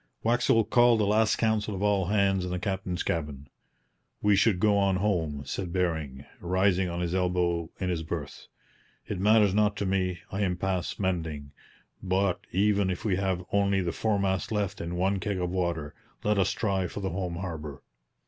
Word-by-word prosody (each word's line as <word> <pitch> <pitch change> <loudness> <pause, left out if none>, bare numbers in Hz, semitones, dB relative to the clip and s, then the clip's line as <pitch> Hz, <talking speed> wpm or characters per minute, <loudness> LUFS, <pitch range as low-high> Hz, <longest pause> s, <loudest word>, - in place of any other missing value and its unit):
Waxel 115 -2 +3
called 120 0 +5
a - - +3
last 105 0 +3
council 110 -2 0
of 95 - -4
all 100 -3 +2
hands 100 -2 +2
in 90 - -3
the 90 - -2
captain's 95 -2 -3
cabin. 75 -4 -3 0.8
'We 105 -1 +5
should 100 -2 +3
go 105 0 +3
on 100 -1 +2
home,' 85 -8 -1
said 90 +6 -4
Bering, 80 -7 -2
rising 95 +1 +1
on 85 0 -3
his 85 0 -2
elbow 90 -2 0
in 95 - -1
his 85 -3 -1
berth. 80 - -6 0.6
'It 100 - -4
matters 105 0 +4
not 105 0 +2
to 100 - -2
me. 90 -3 -1
I 95 - -2
am 90 -3 0
past 95 -1 -2
mending; 80 -7 -2 0.5
but 95 0 +1
even 100 0 +2
if 90 +3 -4
we 95 -4 +1
have 95 -2 -1
only 100 -1 +2
the 90 -2 -1
foremast 100 0 0
left 105 -3 -2
and 85 +1 -4
one 95 +2 +1
keg 100 -1 -2
of 90 -1 -2
water, 85 -5 -2 0.3
let 105 -1 +2
us 95 - +2
try 95 -4 -1
for 100 - -7
the 95 - -2
home 90 -1 -3
harbour. 80 -6 -6
95 Hz, 185 wpm, -28 LUFS, 90-100 Hz, 0.8 s, called